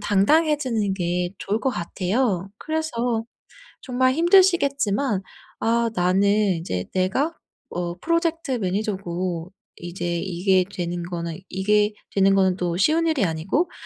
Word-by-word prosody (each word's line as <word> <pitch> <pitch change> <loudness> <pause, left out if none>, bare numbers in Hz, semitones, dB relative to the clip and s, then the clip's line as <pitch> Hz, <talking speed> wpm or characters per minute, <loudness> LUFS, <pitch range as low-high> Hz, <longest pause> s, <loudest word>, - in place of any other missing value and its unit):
당당해지는 225 0 +2
게 175 0 -1
좋을 210 +4 -2
것 270 - +1
같아요. 190 0 -1
그래서 245 -8 -2 0.6
정말 255 0 +1
힘드시겠지만 280 - +3 0.4
'아 230 0 +1
나는 180 +2 +2 0.3
인제 90 - -3
내가 240 - +1 0.4
어 175 -1 -3
프로젝트 335 -3 0
매니저고 185 -5 -2 0.3
이제 175 0 -3
이게 185 +1 +2
되는 175 -1 -3
거는, 170 -1 -5
이게 210 +2 +2 0.2
되는 195 0 +4
거는 190 -1 +3
또 175 -1 -1
쉬운 320 - +3
일이 300 -10 +2
아니고 180 - -1
200 Hz, 265 characters per minute, -23 LUFS, 180-265 Hz, 0.6 s, 되는